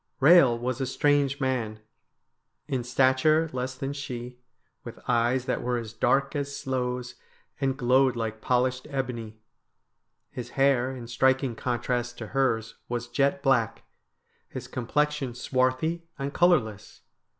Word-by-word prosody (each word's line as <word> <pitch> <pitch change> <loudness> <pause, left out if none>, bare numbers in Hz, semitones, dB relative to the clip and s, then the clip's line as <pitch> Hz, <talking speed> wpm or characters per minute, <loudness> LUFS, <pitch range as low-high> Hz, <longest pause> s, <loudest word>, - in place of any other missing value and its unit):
Eehel 140 -4 +6
was 125 +2 -2
a 135 - -1
strange 140 +1 +2
man. 120 -5 -1 0.9
In 130 -4 -1
stature 130 +6 +3
less 130 0 -3
than 135 +1 -4
she, 125 -3 -6 0.4
with - - -9
eyes 125 +1 +2
that 130 - -1
were 125 0 -1
as 115 -2 -6
dark 135 +5 +1
as 140 -1 -3
sloes, 125 -1 -3 0.5
and 135 -1 0
glowed 130 0 +3
like 110 -1 -4
polished 125 +1 0
ebony. 120 -6 -4 0.9
His 125 - -6
hair, 135 -2 +3
in 120 -2 -8
striking 130 +2 +2
contrast 120 0 -2
to 110 -3 -7
hers, 115 -5 0
was 120 0 -3
jet 140 0 +1
black; 125 -6 +1 0.7
his - - -7
com 125 -3 -5
plexion 150 -4 0
swarthy 130 +7 0
and 140 0 -4
colourless. 110 - +1
130 Hz, 135 wpm, -27 LUFS, 120-135 Hz, 0.9 s, Eehel